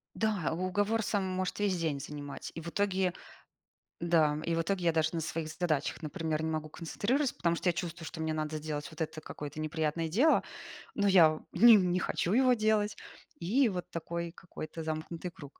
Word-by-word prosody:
Да, 210 -8 0
уговор 205 +5 0
сам 200 -2 0
может 185 +1 -2
весь 200 -2 +2
день 155 -4 -1
занимать, 145 0 -7
и 165 - -5
в 170 - -6
итоге 190 -1 +1 0.9
да, 160 -3 +3
и 170 - 0
в - - +2
итоге 185 0 -1
я 165 - +5
даже 160 -1 +2
на 165 - -1
своих 160 0 -3
задачах, 155 -1 -1
например, 155 0 -2
не 160 - -1
могу 155 -1 -2
концентрироваться, 240 - -1
потому 170 -1 +1
что 180 - 0
я - - +4
чувствую, 170 -1 -5
что 160 - -7
мне 160 0 0
надо 155 0 -2
сделать 150 -1 -4
вот 160 - -13
это 160 0 -3
какое-то 150 -1 -7
неприятное 155 +1 -1
дело, 250 - +4 0.5
но 205 -1 +2
я, 165 -5 +6
ним 220 +1 +8
не 180 - +1
не 180 - +2
хочу 175 - -1
его 255 +1 +5
делать. 215 -2 +2 0.4
И 230 +9 +3
вот 180 -3 -4
такой 170 0 -4
какой-то 165 -2 -8
замкнутый 160 +2 -4
круг. 145 -5 -13
170 Hz, 190 wpm, -31 LUFS, 155-195 Hz, 0.9 s, ним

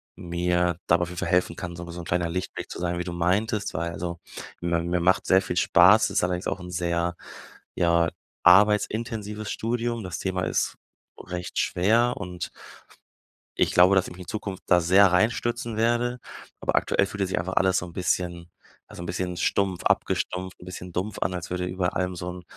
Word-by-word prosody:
mir 90 0 0
dabei 85 +1 +4
auf 85 - -4
jeden 90 -1 -6
Fall 95 - -2
helfen 90 0 +2
kann, 85 -1 -6
so 85 0 -8
wie - - -7
so 85 - -7
'n 85 - -10
kleiner 85 0 0
Lichtblick 90 +2 -4
zu - - -6
sein, 85 0 -1
wie - - -1
du 90 - -5
meintest, 100 +5 0
weil 85 +1 -2
also, 85 0 -5 0.4
mi 85 -1 0
mir 85 +1 0
machts 95 +2 +2
sehr 95 +1 +6
viel 90 - -4
Spaß, 90 +6 +6
ist - - +1
allerdings 90 0 -1
auch - - -2
'n 90 0 -8
sehr, 85 0 -1 0.6
ja, 85 -1 +3 0.3
arbeitsintensives 105 +2 +3
Studium. 115 0 -2
Das 90 -2 -5
Thema 95 -1 -2
ist - - 0 0.4
recht 90 0 -5
schwer 115 +7 +2
und 90 -1 -5 1.1
ich - - +1
glaube, 90 +2 +6
dass 95 -1 +2
ich - - -9
mich 90 - -11
in - - -19
Zukunft 100 -1 -5
da 90 -1 +5
sehr 95 +2 +5
reinstürzen 115 +3 0
werde, 120 +2 +1 0.4
aber - - 0
aktuell 100 - +2
fühlt 100 +1 -6
es 95 - 0
sich - - -1
einfach 90 +2 -3
alles 95 -1 +4
so - - -1
'n 85 - -12
bisschen 85 -1 -2 0.4
ja, - - -12
so 85 - -7
'n - - -6
bisschen 90 0 -3
stumpf 95 -3 0
abgestumpft, 90 0 0
'n - - -11
bisschen 90 0 -8
dumpf 100 +3 -3
an, 90 - -1
als 90 -2 -5
würde 90 0 -2
über 90 0 -2
allem 90 0 -1
so 90 +1 -5
'n 90 0 -9
90 Hz, 205 wpm, -25 LUFS, 85-100 Hz, 1.1 s, sehr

